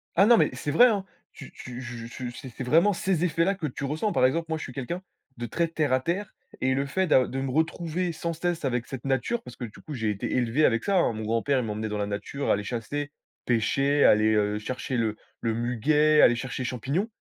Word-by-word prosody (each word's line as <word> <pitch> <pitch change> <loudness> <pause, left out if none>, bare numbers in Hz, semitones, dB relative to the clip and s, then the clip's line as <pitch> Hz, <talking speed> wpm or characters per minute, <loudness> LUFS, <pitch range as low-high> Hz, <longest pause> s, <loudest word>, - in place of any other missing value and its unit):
Ah, 195 - +6
non 235 +1 +7
mais - - +4
c'est 145 - -3
vrai, 245 +11 +7
hein! 205 -4 0 0.3
Tu 140 - -11
tu 125 0 -8
je 120 -1 -7
tu 120 +1 -6
je - - -14
c'est 130 -3 -8
c'est 130 - -7
vraiment 165 +10 +4
ces 180 -2 0
effets-là 170 +3 +1
que 165 -5 -3
tu 135 - -6
ressens. 155 +9 -1
Par 125 - +3
exemple, 165 +6 +1
moi, 160 - -1
je - - -6
suis 125 - -8
quelqu'un 155 +8 -4 0.4
de 120 - -4
très 165 +9 0
terre 155 -5 0
à 130 - +4
terre 175 +8 -3 0.3
et 130 0 +2
le 140 +1 0
fait 190 +7 0
d'a 130 -4 +4
de 135 - -4
me 135 -1 -2
retrouver, 165 +3 -1
sans 170 +1 -3
cesse, 170 -2 -2
avec 120 -3 -1
cette 130 -2 -7
nature, 135 - 0
parce 125 -1 -11
que, 120 - -5
du 105 - -12
coup, 155 - -8
j'ai 115 -4 -1
été 100 -2 -2
élevé 125 +5 +2
avec 115 -1 +2
ça, 200 -1 +2
hein. 170 - +3
Mon 110 0 -5
grand-père, 115 +5 +1
il 120 - -2
m'emmenait 110 +1 -3
dans 105 - -3
la 100 - -1
nature, 105 +7 -4
aller 105 - +2
chasser, 135 +7 -4 0.3
pêcher, 135 +5 +2
aller, 110 +1 +5
heu, 105 0 +1
chercher 130 +3 -3
le 110 -2 0 0.3
le 115 -1 0
muguet, 150 +7 +3
aller 120 - +6
chercher 130 +1 -4
les - - -2
champignons. 140 - -1
135 Hz, 250 wpm, -26 LUFS, 120-160 Hz, 0.4 s, non